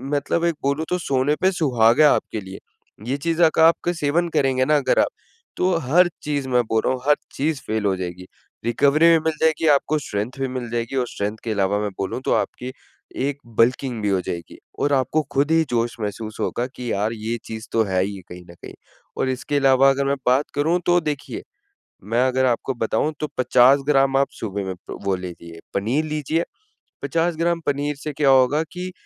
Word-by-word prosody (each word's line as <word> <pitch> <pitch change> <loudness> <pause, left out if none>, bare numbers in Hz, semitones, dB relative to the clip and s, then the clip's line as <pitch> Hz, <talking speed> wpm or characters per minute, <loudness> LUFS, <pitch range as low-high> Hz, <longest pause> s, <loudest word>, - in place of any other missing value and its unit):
मतलब 155 +4 0
एक 170 -1 +1
बोलूँ 140 +3 0
तो 180 - +1
सोने 140 -2 +1
पे 190 - +4
सुहागा 130 -5 +3
है - - +5
आपके 110 - -4
लिए। 95 0 -9 0.5
ये 135 - 0
चीज़ों 165 +2 +2
का 160 - +7
आपका 170 +1 +1
सेवन 170 +2 0
करेंगे 135 -5 +1
ना 150 +1 +3
अगर 140 - +1
आप, - - +4 0.5
तो 180 0 +2
हर 175 +4 +5
चीज़ 145 -3 -2
मैं 125 -1 +3
बोल 110 -1 0
रहा - - +2
हूँ, 130 - -5
हर 150 - +6 0.2
चीज़ 145 0 -1
फ़ेल 110 -1 -1
हो 95 -1 +2
जाएगी। 90 0 -6 0.4
रिकवरी 140 +7 +3
भी 165 -1 +5
मिल 160 0 -1
जाएगी 160 0 +2
आपको 145 +1 +3
स्ट्रेंथ 105 -4 -3
भी 135 - 0
मिल 125 -2 -5
जाएगी 120 +2 -3
और 125 -2 0
स्ट्रेंथ 105 0 -4
के 115 - -3
इलावा 100 -1 +1
मैं 105 0 -2
बोलूँ 95 +5 -3
तो - - +2
आपकी 125 +1 -2 0.6
एक 145 -1 -3 0.2
बल्किंग 125 0 +2
भी 105 - 0
हो 95 -1 +2
जाएगी। 85 0 -6 0.2
और 145 - +1
आपको 135 +3 +1
खुद 140 +2 +1
ही 165 0 +4
जोश 120 -1 0
महसूस 105 +1 -5
होगा 120 - -1
कि 125 -2 -5
यार 105 +3 0
ये 115 +1 -3
चीज़ 110 0 -7
तो 115 - +2
है 95 -3 0
ही 100 0 -5
कहीं 90 0 -10
न - - -13
कहीं। - - -9 0.4
और 130 - 0
इसके 130 +3 -3
इलावा 135 -1 +5
अगर 135 0 +1
मैं 140 - +1
बात 130 +4 +3
करूँ 160 +5 +1
तो 175 0 +4
देखिए 150 -3 -4 0.6
मैं 115 +5 +1
अगर 130 0 +1
आपको 125 +2 0
बताऊँ 120 +5 -1
तो 150 - -2
50 130 +2 +5
ग्राम 135 -2 +3
आप 140 - +3
सुबह 100 -2 -4
में 95 -1 -4
प्रो 90 - -10
वो 100 -1 +1
ले 90 -1 -6
लिए 85 -1 -11
पनीर 120 +10 0
लीजिए। 155 +2 -1 0.6
50 165 +1 0
ग्राम 170 +1 +1
पनीर 145 +1 -1
से 150 +1 -6
क्या 140 0 +2
होगा 135 +3 +4
कि 180 +1 -6
135 Hz, 210 wpm, -22 LUFS, 110-150 Hz, 0.6 s, का